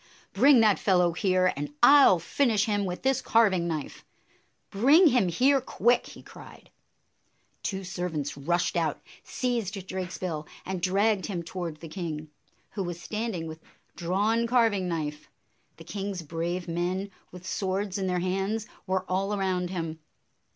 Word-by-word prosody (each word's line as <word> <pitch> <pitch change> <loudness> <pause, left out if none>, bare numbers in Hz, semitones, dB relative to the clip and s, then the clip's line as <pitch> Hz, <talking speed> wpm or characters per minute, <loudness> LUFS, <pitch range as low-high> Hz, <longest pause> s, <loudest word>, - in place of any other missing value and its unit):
"Bring 275 -4 +6
that 215 -3 +4
fellow 180 -3 +3
here, 185 +1 +2
and 145 +1 -5
I 285 0 +9
'll 185 - +5
finish 215 - +1
him 205 -2 0
with 180 -1 -5
this 265 -1 +2
carving 195 -7 +3
knife! 155 -4 -5 0.7
Bring 280 - +5
him 245 -8 +3
here 265 +10 +3
quick!" 245 -1 +1
he - - -12
cried. - - -14 0.9
Two 195 -1 -3
servants 175 -6 -4
rushed 170 +7 -1
out, 165 -4 0 0.2
seized 235 -5 -2
Drakesbill, 180 -4 -4 0.2
and 185 -1 -4
dragged 195 +2 +1
him 175 -4 -4
toward 170 -3 -6
the 165 - -7
king, 155 -3 -5 0.4
who 200 - -4
was 175 -2 -4
standing 210 -1 -4
with 160 0 -8 0.3
drawn 205 +7 0
carving 225 -6 +2
knife. 150 -3 -4 0.5
The 165 - -11
king's 195 +1 -5
brave 170 +3 -3
men, 180 +4 -2 0.2
with 180 0 -11
swords 195 +1 -2
in 190 - -1
their 180 -1 0
hands, 195 +4 -1 0.2
were 185 0 0
all 195 +3 -1
around 185 -2 -1
him. 165 -3 -4
185 Hz, 150 wpm, -27 LUFS, 170-205 Hz, 0.9 s, I